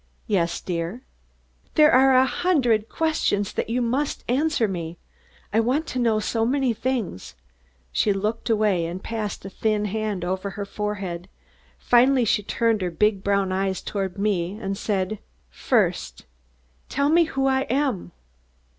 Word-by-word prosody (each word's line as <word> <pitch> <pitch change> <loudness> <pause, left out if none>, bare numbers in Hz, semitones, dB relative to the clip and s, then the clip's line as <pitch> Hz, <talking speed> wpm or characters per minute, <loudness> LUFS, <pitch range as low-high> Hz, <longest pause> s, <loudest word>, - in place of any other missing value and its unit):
"Yes, 175 -6 0
dear." 175 +7 -4 0.7
"There 305 -1 +6
are 265 +1 +6
a 260 +1 +6
hundred 250 -10 +1
questions 310 - 0
then - - -1
that - - -5
you 245 +1 +1
must 265 +5 -1
answer 270 -2 +1
me. 170 -3 -5 0.6
I 220 - +4
want 260 +8 +1
to 255 - -3
know 225 -3 +2
so 225 +1 -1
many 260 0 +1
things." 235 - -3 0.6
She 205 - +2
looked 210 +4 -2
away 210 -6 +2
and 180 +3 -6
passed 215 -4 -4
a - - -5
thin 210 +1 0
hand 210 -3 -2
over 190 +2 -2
her 200 - -3
forehead. 200 -4 -4 0.5
Finally 250 +1 +4
she 210 - +2
turned 225 +1 0
her 180 - 0
big 195 +3 +1
brown 200 -1 +1
eyes 190 0 -1
toward 195 -2 -4
me 195 -2 -1
and 195 -2 -3
said: 200 0 -2 0.3
"First, - - 0 0.6
tell 280 +2 +1
me 335 +2 +5
who 270 -3 -1
I 265 0 +1
am!" 260 -6 0
215 Hz, 155 wpm, -24 LUFS, 195-255 Hz, 0.7 s, There